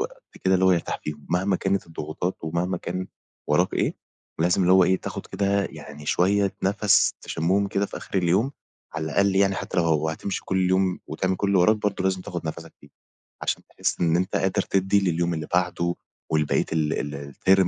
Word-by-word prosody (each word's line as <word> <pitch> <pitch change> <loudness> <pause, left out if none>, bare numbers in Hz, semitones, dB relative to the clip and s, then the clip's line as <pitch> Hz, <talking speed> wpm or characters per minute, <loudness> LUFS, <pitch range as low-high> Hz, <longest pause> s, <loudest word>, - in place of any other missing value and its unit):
وقت - - -5 0.2
كده 95 0 +4
اللي 95 0 +3
هو 95 - +6
يرتاح 85 - -1
فيهم 75 -1 -6
مهما 95 +2 +2
كانت 95 -1 -1
الضغوطات 80 +3 -4
ومهما 85 +3 -1
كان 90 +2 -4 0.4
وراك - - +2
إيه - - 0 0.5
لازم 90 +2 +3
اللي 90 +1 +4
هو 95 -1 +7
إيه 95 +1 +3
تاخد - - -6
كده 100 0 0
يعني 75 -1 -10
شوية 100 +2 +2
نفس 100 +1 +3
تشمهم 95 +5 0
كده 100 0 0
في - - -8
آخر 95 - -3
اليوم 95 +10 +2 0.4
على 80 0 -2
الأقل 95 +5 +2
يعني 95 0 +4
حتى 95 - -5
لو 80 -2 +2
هتمشي 80 +5 -3
كل 95 -1 +1
يوم 95 -1 +2
وتعمل 95 0 -1
كل 100 - -1
اللي 100 -2 +3
وراك 110 +5 +5
برضه 105 -2 -2
لازم 95 -1 +1
تاخد 85 -4 -5
نفَسَك 80 +1 -6
فيه، - - -17 0.6
عشان - - -1
تحس - - -2
إن 85 -1 +3
أنت 95 +2 -1
قادر 95 0 +1
تدي 95 +1 +2
لليوم 85 +1 0
اللي 80 -1 -4
بعده 85 -1 +1 0.4
و 80 - +3
لبقية 75 -1 +1
ال 75 -2 -1
ال 70 0 -8
الterm 95 -1 +4
95 Hz, 195 wpm, -25 LUFS, 85-95 Hz, 0.6 s, هو